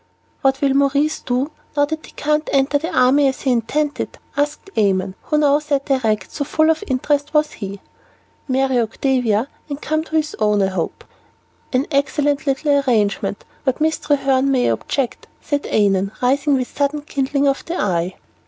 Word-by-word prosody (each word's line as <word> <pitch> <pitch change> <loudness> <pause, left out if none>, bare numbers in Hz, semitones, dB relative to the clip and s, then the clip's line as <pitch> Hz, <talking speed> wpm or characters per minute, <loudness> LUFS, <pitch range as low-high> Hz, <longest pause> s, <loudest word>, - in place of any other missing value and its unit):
"What 270 -1 +2
will 275 -2 +3
Maurice 280 +2 +2
do, 255 +4 -1 0.3
now 290 - +5
that 315 +1 -5
he - - -14
can't 300 +1 0
enter 275 +1 +2
the 325 +3 -4
army 265 +3 +4
as 265 - -2
he 265 - +1
intended?" 285 +5 -1 0.2
asked 295 +7 -2
Annon, 190 -3 +1
who 300 - +1
now 290 -1 +4
sat 285 -2 -2
erect, 220 -7 0
so 290 - -3
full 315 +2 +3
of 315 - -2
interest 290 +3 0
was 300 0 +3
he. 200 -2 -7 0.7
"Marry 265 -1 +2
Octavia, 235 0 +1 0.2
and 285 -1 -4
come 310 +1 -1
to 320 - -5
his 310 -1 0
own, 210 -2 +3
I 190 - +2
hope." 185 -4 -3 0.7
"An 255 +2 +1
excellent 285 +1 +1
little 285 +1 +2
arrangement, 210 -6 0 0.2
but 260 -2 0
Miss 315 +1 +1
Treherne 275 -2 +2
may 255 -2 +2
object," 270 -4 -2
said 290 -1 -2
Annon, 195 -1 +2
rising 275 +3 +2
with 255 -2 -3
sudden 290 +1 0
kindling 280 -1 0
of 275 0 0
the 345 +2 -3
eye. 180 -2 0
275 Hz, 170 wpm, -20 LUFS, 245-295 Hz, 0.7 s, now